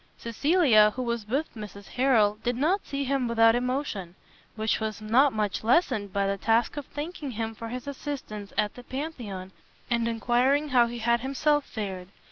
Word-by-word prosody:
Cecilia, 230 - +4
who 255 - -2
was 235 -3 -3
with 275 +8 -1
Mrs 205 -2 -9
Harrel, 225 -5 +3
did 245 0 0
not 330 +10 +1
see 280 0 -2
him 270 -2 0
without 225 -1 +5
emotion; 245 -8 -2 0.4
which 220 0 0
was 220 -2 -3
not 240 +7 +4
much 210 -3 -2
lessened 230 - +2
by 200 +1 0
the 195 0 -1
task 225 +4 +2
of 290 -2 -6
thanking 300 -1 -6
him 225 -1 -3
for 230 +1 -7
his 250 +1 -6
assistance 265 -8 -6
at 210 - +1
the 245 - -11
Pantheon, 245 -10 -6 0.4
and 235 -1 +1
enquiring 250 +6 +2
how 245 -3 +4
he 240 +1 -6
had 235 +1 +2
himself 285 +3 +1
fared. 190 -5 -5
235 Hz, 175 wpm, -27 LUFS, 215-275 Hz, 0.4 s, without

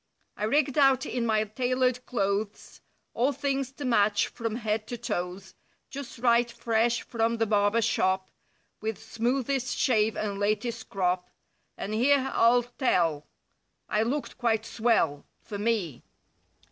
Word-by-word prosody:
I 210 - -2
rigged 285 +4 +2
out 270 -2 +4
in 240 -2 -2
my 215 -1 +2
tailored 250 +3 0
clothes; 200 -2 -2 0.3
All 250 +5 +2
things 275 -2 -2
to 285 - -6
match 205 -4 +3
from 230 -2 -4
head 215 -2 -2
to 240 - -5
toes; 190 -4 -4 0.4
Just 280 -2 -7
right 235 0 +3
fresh 235 0 0
from 230 -1 0
the 225 - +2
barber 205 +1 +2
shop, 190 -3 +1 0.5
With 220 -1 -2
smoothest 255 +2 -1
shave 220 -4 +2
and 200 -2 -3
latest 220 +3 -1
crop—• 180 -1 -1 0.5
And 210 - -4
here 265 +4 +3
I'll 240 +1 +4
tell, 170 - 0 0.6
I 210 - +1
looked 260 +4 -2
quite 225 -2 +1
swell—■ 220 -13 +1 0.2
For 205 -3 -6
me. 205 - -1
230 Hz, 135 wpm, -28 LUFS, 210-245 Hz, 0.6 s, out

